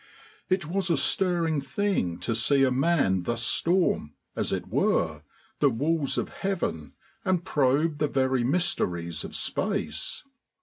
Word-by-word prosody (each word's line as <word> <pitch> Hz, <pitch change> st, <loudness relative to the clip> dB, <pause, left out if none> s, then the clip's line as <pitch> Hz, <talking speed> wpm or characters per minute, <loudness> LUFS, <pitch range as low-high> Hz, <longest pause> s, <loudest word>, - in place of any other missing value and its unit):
It 185 Hz, -2 st, +1 dB
was 185 Hz, +3 st, -1 dB
a 165 Hz, -, +3 dB
stirring 170 Hz, -2 st, +2 dB
thing 175 Hz, -, -1 dB
to 115 Hz, -, -1 dB
see 135 Hz, +5 st, +3 dB
a 130 Hz, -, +3 dB
man 130 Hz, -, +2 dB
thus 120 Hz, +5 st, -2 dB
storm, 165 Hz, -, +1 dB, 0.2 s
as -, -, -1 dB
it -, -, -2 dB
were, 80 Hz, -3 st, +1 dB, 0.4 s
the 145 Hz, -, +4 dB
walls 145 Hz, +4 st, 0 dB
of -, -, -1 dB
Heaven 160 Hz, -, -3 dB, 0.3 s
and 185 Hz, -2 st, 0 dB
probe 145 Hz, +1 st, +1 dB
the 150 Hz, -, +2 dB
very 130 Hz, -2 st, +1 dB
mysteries 90 Hz, -, -1 dB
of -, -, -7 dB
space. -, -, -2 dB
145 Hz, 140 wpm, -27 LUFS, 120-170 Hz, 0.4 s, the